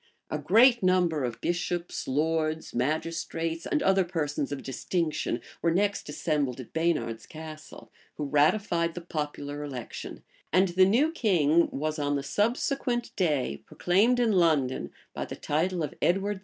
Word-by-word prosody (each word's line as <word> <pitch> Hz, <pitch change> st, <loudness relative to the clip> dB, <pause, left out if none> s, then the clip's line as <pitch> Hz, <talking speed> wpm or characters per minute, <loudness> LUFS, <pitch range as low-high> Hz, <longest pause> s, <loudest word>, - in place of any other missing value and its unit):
[*] -, -, -29 dB
A -, -, -1 dB
great 240 Hz, +1 st, +5 dB
number 180 Hz, -5 st, +2 dB
of 120 Hz, -2 st, -3 dB
bishops, 175 Hz, 0 st, -2 dB
lords, 155 Hz, +3 st, 0 dB
magistrates, 165 Hz, +4 st, -2 dB
and 300 Hz, -, 0 dB
other 195 Hz, 0 st, +4 dB
persons 150 Hz, -5 st, -2 dB
of 145 Hz, -, -4 dB
distinction 155 Hz, +5 st, -2 dB, 0.2 s
were 170 Hz, -, +2 dB
next 200 Hz, 0 st, 0 dB
assembled 145 Hz, -4 st, -1 dB
at 125 Hz, -, -10 dB
Baynard's 160 Hz, -9 st, -1 dB
Castle, 155 Hz, 0 st, -10 dB, 0.3 s
who -, -, -3 dB
ratified 170 Hz, +3 st, +2 dB
the 175 Hz, -, -5 dB
popular 150 Hz, -3 st, -4 dB
election; 130 Hz, -5 st, -7 dB, 0.3 s
and 185 Hz, +3 st, +4 dB
the 185 Hz, +2 st, +5 dB
new 250 Hz, +11 st, +3 dB
king 170 Hz, -, +3 dB
was 155 Hz, +2 st, -3 dB
on 145 Hz, 0 st, 0 dB
the 140 Hz, -, -2 dB
subsequent 240 Hz, -, -1 dB
day 145 Hz, -, 0 dB
proclaimed 215 Hz, +8 st, +2 dB
in 235 Hz, -2 st, +3 dB
London, 155 Hz, -9 st, +2 dB, 0.2 s
by -, -, -3 dB
the -, -, -6 dB
title 170 Hz, +3 st, -1 dB
of 150 Hz, -, -4 dB
Edward 195 Hz, +3 st, +1 dB
IV. -, -, -14 dB
165 Hz, 155 wpm, -28 LUFS, 150-185 Hz, 0.3 s, great